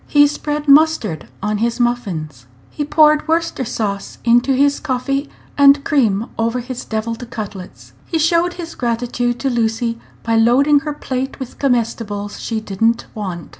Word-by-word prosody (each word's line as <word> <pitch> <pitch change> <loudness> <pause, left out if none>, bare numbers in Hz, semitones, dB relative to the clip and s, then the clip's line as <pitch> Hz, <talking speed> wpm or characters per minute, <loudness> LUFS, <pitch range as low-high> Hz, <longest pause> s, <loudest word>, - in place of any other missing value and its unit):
He 290 0 +5
spread 295 0 -3
mustard 280 - +3 0.2
on 210 0 -1
his 230 +2 -1
muffins. 175 - -2 0.2
He 295 - -3
poured 305 +1 +4
Worcester 330 -3 0
sauce 205 -4 -3
into 240 +3 +4
his 285 +2 +2
coffee, 275 +2 -2 0.3
and 280 0 +6
cream 225 -7 +2
over 230 +2 0
his 250 0 -6
deviled 230 +2 -4
cutlets. 185 - -8
He 330 - -1
showed 335 +2 +2
his 335 -2 -7
gratitude 240 0 -1
to 275 - +1
Lucy 230 0 -1 0.2
by 230 0 +1
loading 270 +6 +4
her 300 +1 -4
plate 265 -2 -4
with 260 -2 -8
comestibles 225 -5 -1
she 225 -2 -3
did 200 -2 -9
n't 230 +1 +2
want. 185 -6 -6
240 Hz, 155 wpm, -18 LUFS, 220-285 Hz, 0.3 s, and